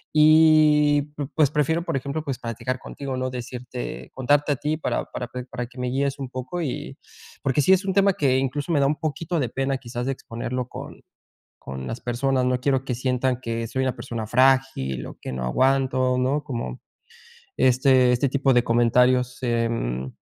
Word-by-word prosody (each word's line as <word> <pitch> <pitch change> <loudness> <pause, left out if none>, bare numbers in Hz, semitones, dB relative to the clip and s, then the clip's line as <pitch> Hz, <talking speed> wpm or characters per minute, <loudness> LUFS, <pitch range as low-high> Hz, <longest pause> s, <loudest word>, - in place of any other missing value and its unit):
y 155 -1 +6
pu 145 -2 -4
pues, 155 -3 +4
prefiero, 155 +3 +1
por - - -2
ejemplo, 140 +4 -4
pues 135 -4 -3
platicar 115 +2 -4
contigo, 135 +1 -6
¿no?, 130 0 -1
decirte 125 0 -6
contarte 145 +3 +2
a - - -2
ti 150 +4 -1
para 155 - -2
para 125 - -6
pe 125 +1 -7
para 125 -1 -5
que 125 +2 -19
me 125 - -2
guíes 135 +2 -1
un 135 -2 -5
poco. 130 +7 -5
Y, 145 -6 -4 0.5
porque 135 +1 +2
sí 185 - +5
es 190 +1 +2
un 190 - 0
tema 200 0 +4
que, 140 -8 +2
incluso, 135 +4 -2
me 155 - +3
da - - +4
un 150 +2 0
poquito 160 +3 -2
de 125 -5 -1
pena, 135 +2 -1
quizás, 120 -1 -5
de - - +1
exponerlo 125 0 -5
con - - -9 0.6
con 65 0 -7
las 115 - -5
personas, 130 +2 0
no 125 0 0
quiero 135 -1 +1
que 125 - -2
sientan 125 0 0
que 115 -1 -3
soy 130 +3 -1
una 130 -1 -1
persona 120 -3 -5
frágil 130 - +2
o - - -11
que - - -5
no 65 -1 -4
aguanto, 130 - +2
¿no?, 135 +4 0
como 115 - -5 0.8
este 130 0 +4
este 125 +3 +2
tipo 135 0 +2
de 120 -1 +4
comentarios, 125 +2 +3
em, 115 - -1
130 Hz, 190 wpm, -24 LUFS, 125-140 Hz, 0.8 s, y